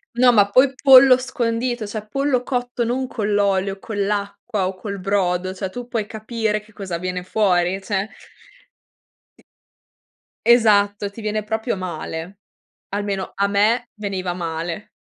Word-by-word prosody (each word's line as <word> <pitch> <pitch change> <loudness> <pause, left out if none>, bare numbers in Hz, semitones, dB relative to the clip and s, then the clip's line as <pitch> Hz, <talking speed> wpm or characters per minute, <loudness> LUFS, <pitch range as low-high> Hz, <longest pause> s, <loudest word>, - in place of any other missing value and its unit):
No, 245 0 +5
ma 205 -2 +4
poi 260 +4 +4
pollo 265 -1 +8
scondito, 240 -2 -2
cioè 210 +1 -5
pollo 275 0 0
cotto 245 -2 -2
non 250 +3 -1
con 210 -4 -3
l'olio, 195 -1 +1
con 220 +1 -7
l'acqua 200 0 -2
o 190 - -3
col 200 +2 -6
brodo, 185 -1 0
cioè 190 0 -4
tu 245 +4 -7
puoi 230 -4 -2
capire 220 0 -2
che 215 +1 -21
cosa 190 -5 -5
viene 180 +1 -3
fuori, 185 -1 +1
cioè. 195 +1 -2 1.3
I - - -22 1.0
Esatto, 205 -4 +4
ti 215 - -11
viene 215 -1 -2
proprio 220 +1 -2
male. 180 +1 -6 0.5
Almeno, 200 -1 -3
a 200 +1 +1
me 220 +4 +2
veniva 190 -4 -3
male. 170 +2 -4
205 Hz, 145 wpm, -21 LUFS, 190-235 Hz, 1.3 s, pollo